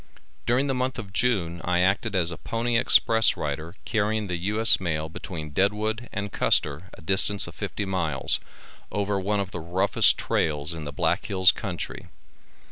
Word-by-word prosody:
During 125 +4 +2
the 135 - -1
month 130 +1 -2
of 100 -6 -8
June 90 -8 0
I 90 0 +1
acted 100 +3 +1
as 85 -2 +1
a 85 - -6
pony 115 +1 -2
express 115 -1 +4
rider 80 +4 -4
carrying 110 0 0
the 90 -2 -3
U.S. 105 +6 +3
mail 80 -4 -2
between 80 -2 -7
Deadwood 105 +7 -1
and 100 0 -4
Custer, 75 +6 +1
a - - -16
distance 95 +3 +4
of - - -9
fifty 105 - -4
miles, 80 -8 +1 0.5
over 100 -1 -1
one 100 +2 -1
of 100 -1 -3
the 90 - -5
roughest 85 +3 +2
trails 75 0 -1
in 80 -2 -7
the 75 - -5
Black 70 - -1
Hills 95 -1 +5
country. 95 -6 -6
95 Hz, 170 wpm, -25 LUFS, 85-110 Hz, 0.5 s, Hills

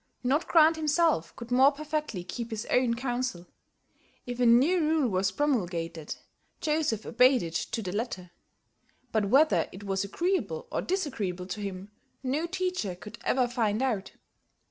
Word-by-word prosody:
Not 280 +7 +1
Grant 320 -1 +5
himself 310 - +1
could 235 0 -9
more 265 +3 +6
perfectly 300 - -3
keep 225 +7 -5
his 220 -1 -4
own 250 -2 +3
counsel. 245 -7 -3 0.8
If 245 0 -5
a 245 - +4
new 270 +11 +5
rule 310 -3 +2
was 190 -1 +1
promulgated, 175 - -2 0.4
Joseph 300 -9 0
obeyed 250 -1 +4
it 165 -1 -5
to 215 +7 -2
the 180 - -4
letter. 190 -6 -4 0.8
But 215 -2 +1
whether 275 +10 +4
it 190 +3 -10
was 195 -1 -1
agreeable 210 - -1
or - - -1
disagreeable 255 - -2
to 190 +3 -5
him, 195 0 -6 0.3
no 285 +6 -1
teacher 365 - -2
could 210 +5 -11
ever 255 -1 +2
find 230 -1 0
out. 220 -7 -1
240 Hz, 150 wpm, -28 LUFS, 195-295 Hz, 0.8 s, more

